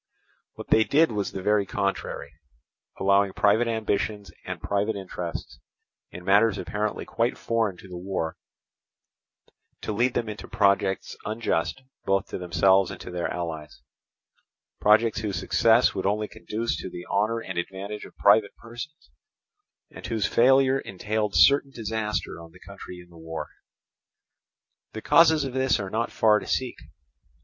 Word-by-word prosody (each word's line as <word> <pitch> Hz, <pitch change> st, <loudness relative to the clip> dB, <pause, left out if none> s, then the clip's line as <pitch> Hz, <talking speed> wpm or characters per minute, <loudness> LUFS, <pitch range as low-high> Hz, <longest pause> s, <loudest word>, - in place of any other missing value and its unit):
What -, -, -10 dB
they 110 Hz, -, +5 dB
did 155 Hz, +5 st, +3 dB
was 105 Hz, -2 st, -2 dB
the 95 Hz, -, -6 dB
very 105 Hz, 0 st, +3 dB
contrary, 100 Hz, +1 st, -3 dB, 0.7 s
allowing 100 Hz, 0 st, +3 dB
private 105 Hz, +4 st, +3 dB
ambitions 105 Hz, -2 st, -2 dB, 0.2 s
and -, -, -4 dB
private 100 Hz, +2 st, -1 dB
interests, 85 Hz, -9 st, -6 dB, 0.5 s
in 90 Hz, -, -10 dB
matters 100 Hz, +2 st, +4 dB
apparently 105 Hz, +5 st, -3 dB
quite 115 Hz, +2 st, -1 dB
foreign 110 Hz, -5 st, -1 dB
to 95 Hz, -, -13 dB
the 90 Hz, -1 st, -8 dB
war, 90 Hz, -3 st, -3 dB, 1.5 s
to -, -, -3 dB
lead 120 Hz, +4 st, +1 dB
them 115 Hz, -, -1 dB
into 105 Hz, 0 st, -7 dB
projects 100 Hz, -2 st, +1 dB
unjust 110 Hz, +1 st, -2 dB, 0.2 s
both 95 Hz, 0 st, +1 dB
to -, -, -5 dB
themselves 95 Hz, +2 st, +3 dB
and -, -, -8 dB
to -, -, -8 dB
their 90 Hz, -1 st, -2 dB
allies—projects 85 Hz, -, -2 dB
whose 105 Hz, -3 st, -3 dB
success 115 Hz, +5 st, +3 dB
would 95 Hz, -, -2 dB
only 105 Hz, +1 st, 0 dB
conduce 110 Hz, 0 st, -3 dB
to 80 Hz, -, -6 dB
the 90 Hz, 0 st, -8 dB
honour 110 Hz, +3 st, 0 dB
and 95 Hz, -5 st, -4 dB
advantage 100 Hz, +4 st, -6 dB
of -, -, -13 dB
private 100 Hz, 0 st, +4 dB
persons, 120 Hz, -, -10 dB, 0.8 s
and -, -, -9 dB
whose 110 Hz, -3 st, -1 dB
failure 135 Hz, +2 st, +4 dB
entailed 105 Hz, +1 st, -3 dB
certain 140 Hz, 0 st, +5 dB
disaster 110 Hz, -6 st, -3 dB
on 85 Hz, 0 st, -13 dB
the 90 Hz, -, -16 dB
country 95 Hz, -2 st, -10 dB
in 90 Hz, 0 st, -15 dB
the 85 Hz, -, -15 dB
war. 80 Hz, 0 st, -6 dB, 1.4 s
The 110 Hz, -, -7 dB
causes 160 Hz, 0 st, +5 dB
of 135 Hz, -2 st, -4 dB
this 130 Hz, -2 st, +2 dB
are 95 Hz, -2 st, -5 dB
not 115 Hz, +2 st, -1 dB
far 105 Hz, -1 st, +4 dB
to -, -, -10 dB
seek. 130 Hz, -2 st, -1 dB
105 Hz, 150 wpm, -26 LUFS, 95-115 Hz, 1.5 s, they